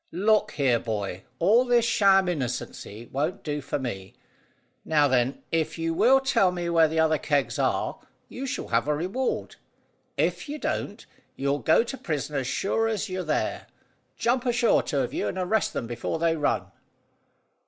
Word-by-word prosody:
"Look 210 +4 +2
here, 130 -5 +2
boy. 100 -5 -4
All 215 - +4
this 240 -2 +3
sham 195 -4 +4
innocency 125 - -4
won't 150 +6 -2
do 150 -1 -3
for 140 - -3
me. 95 -8 -6 0.7
Now, 150 -2 +3
then, 130 0 0
if 160 -1 0
you 165 0 -1
will 265 +10 +5
tell 240 -9 +2
me 175 -1 -3
where 165 -1 +5
the 160 +1 -1
other 160 -1 +3
kegs 145 -3 0
are, - - 0 0.3
you 270 +2 -6
shall 270 - -4
have 115 +3 +1
a 150 - +2
reward; 190 - -2 0.6
if - - -1
you 295 - -4
don't, - - -3 0.3
you'll 140 +1 0
go 160 +10 +4
to 270 +3 -6
prison 150 -2 -3
as 135 -2 -1
sure 225 +9 0
as 215 -2 -2
you're 185 0 -3
there. 155 -4 -2 0.5
Jump 250 +2 +1
ashore, 240 -1 +3
two 140 - -1
of 125 - -3
you, - - -1
and - - -4
arrest 190 +4 0
them - - -3
before 120 +7 -3
they 165 0 +1
run." 150 -2 -1
165 Hz, 175 wpm, -26 LUFS, 140-215 Hz, 0.7 s, will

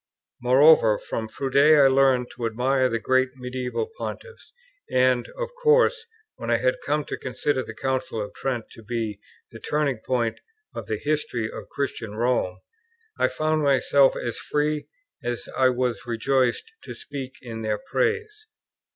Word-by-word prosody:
Moreover, 125 -3 +6
from 110 - -4
Froude 130 +4 -5
I 145 0 +7
learned 130 -2 +3
to 120 -2 -3
admire 130 +3 +1
the 115 - 0
great 130 +3 +2
medieval 125 - -3
Pontiffs; 480 -1 -7 0.4
and, 125 -1 +2
of - - -3
course, 465 0 +3 0.3
when - - -6
I - - +4
had - - 0
come 150 -1 0
to - - -5
consider 130 +1 -1
the - - -8
Council 130 -1 -2
of 105 -1 -5
Trent 125 -4 -3
to - - -13
be 110 -2 -3 0.3
the 115 - -10
turning 145 -4 -1
point 120 -1 -1 0.3
of - - -7
the 110 - -1
history 135 -7 -2
of - - -9
Christian 115 -6 -4
Rome, 110 -6 0 0.6
I - - +4
found 155 0 0
myself 140 -1 +4
as 120 - -4
free, 150 0 -1 0.4
as 120 -1 -4
I 130 -1 +4
was 125 -1 -1
rejoiced, 125 - 0
to - - -7
speak 135 -3 -7
in 115 -2 -7
their 110 -1 -1
praise. 440 - -2
130 Hz, 155 wpm, -25 LUFS, 120-150 Hz, 0.6 s, I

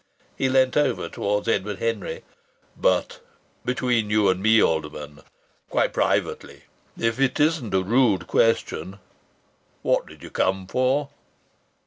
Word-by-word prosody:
He 135 - 0
leant 130 0 +3
over 135 -11 +1
towards 105 +1 -2
Edward 105 -2 0
Henry. 115 -3 -3 0.5
"But - - 0 0.4
between 125 -4 0
you 105 -2 +3
and 95 0 0
me, 110 +2 +5
Alderman, 75 -4 -1 0.5
quite - - +1
privately, - - -1 0.3
if 115 +2 -1
it 135 -1 +1
isn't 150 -8 +1
a 95 - +2
rude 105 -4 +2
question, 100 -3 0 0.9
what - - +1
did - - -14
you - - -10
come 95 0 0
for?" 130 +7 0
110 Hz, 125 wpm, -24 LUFS, 95-130 Hz, 0.9 s, me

